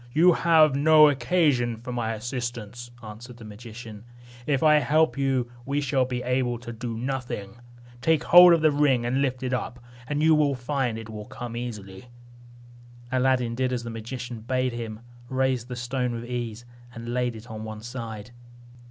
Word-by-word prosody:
"You 175 +3 +6
have 160 -3 +4
no 155 +1 +7
occasion 130 -4 +1
for 125 +2 -7
my 115 -2 -2
assistance," 120 0 -5
answered 115 +3 -10
the 115 - -11
magician; 110 0 -10 0.4
"if 140 -1 +1
I 150 -1 +6
help 155 +2 +2
you, 135 -3 0
we 140 +3 -1
shall 135 -2 +1
be 125 -1 -4
able 125 -1 0
to 120 0 -8
do 115 0 -5
nothing. 120 -5 -4 0.4
Take 160 +2 +2
hold 175 0 +9
of 165 - +2
the 155 -1 +4
ring, 140 -5 +2
and 130 +3 0
lift 130 -2 -1
it 130 0 -2
up; 125 0 -3 0.3
you 155 +2 +3
will 150 -2 +3
find 125 -2 -2
it 115 -1 -8
will 105 -1 -7
come 120 +1 -7
easily." 105 -5 -7 1.1
Aladdin 130 -2 +1
did 130 +1 -1
as 125 -2 -2
the 115 - -6
magician 120 +1 -6
bade 130 +2 -1
him, 115 -2 -6 0.3
raised 130 -2 0
the 125 - -6
stone 125 0 -2
with 115 0 -5
ease, 120 -2 -5 0.3
and 115 +1 -6
laid 125 -1 -1
it 110 0 -10
on 110 0 -6
one 110 -1 -7
side. 115 -2 -7
125 Hz, 175 wpm, -25 LUFS, 115-135 Hz, 1.1 s, hold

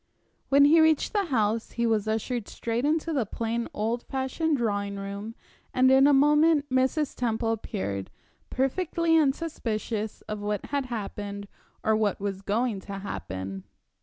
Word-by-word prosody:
When 280 +1 +6
he 320 +3 +6
reached 315 +3 +3
the 405 -2 +1
house 225 -6 0
he 235 - 0
was 220 -2 +1
ushered 225 +1 -2
straight 235 +3 -2
into 320 +2 +1
the 270 -5 +1
plain, 230 +2 -3
old 225 +3 -1
fashioned 270 +5 -1
drawing 205 -4 -1
room, 200 +3 -6 0.4
and 260 +1 +5
in 270 +1 +6
a - - +6
moment 295 +2 +4
Mrs. 260 +3 +1
Temple 225 -1 0
appeared, 100 - -3 0.4
perfectly 325 +5 +1
unsuspicious 240 -8 -1
of 215 0 -6
what 205 0 -2
had 280 -2 -2
happened 205 -3 -5 0.4
or 220 - +3
what 215 -3 0
was 195 -1 -3
going 215 +1 0
to 200 +1 -9
happen. 95 - -5
230 Hz, 150 wpm, -27 LUFS, 205-280 Hz, 0.4 s, When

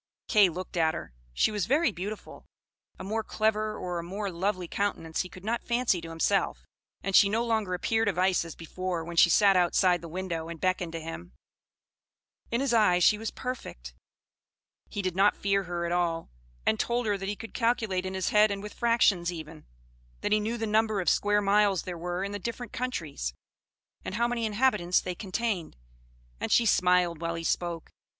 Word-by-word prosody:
Kay 210 -5 +5
looked 180 +1 -6
at 160 -1 +2
her. - - -7 0.2
She - - +2
was 205 -4 -1
very 290 0 +3
beautiful; 200 +3 -7 0.5
a - - -8
more 220 +3 -2
clever, 215 0 0
or 180 -1 -3
a - - -5
more 195 +3 -4
lovely 185 +1 -2
countenance 165 -4 -2
he 180 - -6
could 185 +2 -12
not 235 +2 -1
fancy 235 -7 +1
to 165 - -8
himself; 165 +5 0 0.4
and 195 -1 -1
she 200 - +7
no 225 +3 0
longer 220 -5 0
appeared 225 +4 0
of 195 -4 0
ice 185 -1 +3
as 165 -2 -9
before, 175 +1 -4
when 170 0 -7
she 170 - +6
sat 200 +2 +5
outside 180 0 +3
the 170 - -8
window, 170 -2 -4
and 170 -1 -7
beckoned 185 -1 0
to 165 - -3
him; 155 - -8 1.2
in 235 +2 0
his 275 -3 0
eyes 180 -6 +4
she 210 +3 +5
was 225 -1 -3
perfect, 60 - -6 1.0
he 200 - -4
did 185 -2 -2
not 200 +2 +4
fear 195 -1 0
her 175 -1 -3
at 170 - -2
all, 170 - -1 0.3
and 110 - +2
told 240 0 0
her 205 -1 +1
that 195 0 -4
he 205 - -2
could 225 - -10
calculate 225 -6 0
in 190 0 -4
his 190 -2 0
head 210 0 +5
and 200 0 -4
with 210 - -7
fractions, 210 -7 +2
even; 160 -2 -9 0.5
that - - -1
he 215 - +4
knew 220 +3 -2
the 225 - -2
number 215 -1 +2
of 180 - +1
square 205 0 +2
miles 200 -2 +3
there 180 -2 -5
were 175 +2 -3
in 200 - -3
the 205 - -4
different 235 +2 -6
countries, 160 - -3 0.7
and - - -5
how 235 +2 +2
many 235 -2 -1
inhabitants 210 -5 +2
they 180 - -4
contained; 195 - -3 0.6
and - - -3
she 235 - +5
smiled 180 -4 +3
while 170 0 -2
he 165 - -5
spoke. 170 -1 -2
190 Hz, 200 wpm, -28 LUFS, 175-215 Hz, 1.2 s, she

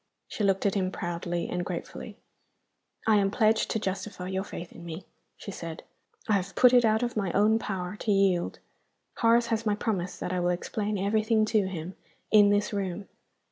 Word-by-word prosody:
She 215 - -4
looked 195 0 +2
at 200 - +3
him 185 -2 0
proudly 175 -1 -3
and 180 0 -2
gratefully. - - -6 0.9
"I 220 -1 +5
am 195 -1 +3
pledged 220 +1 +2
to - - 0
justify 190 -2 -4
your 190 0 -1
faith 175 -3 -8
in 170 - -12
me," 170 +2 -7 0.3
she 200 - -7
said. 165 -3 -7 0.4
"I 215 - +2
have 195 -1 -1
put 250 -1 +6
it 245 -1 +6
out 220 +1 +3
of 240 0 -2
my 195 -5 -1
own 215 +2 +4
power 190 -2 -4
to 215 - -1
yield. 195 -3 +2 0.6
Horace 230 0 +4
has 225 0 0
my 210 -2 +1
promise 195 -5 -2
that 180 - -4
I 180 - 0
will 175 0 +1
explain 205 +4 -2
everything 215 +2 +2
to 215 -3 +1
him, 180 -1 -5 0.4
in 205 -2 +7
this 205 +1 +1
room." 195 -1 -3
200 Hz, 190 wpm, -28 LUFS, 180-215 Hz, 0.9 s, in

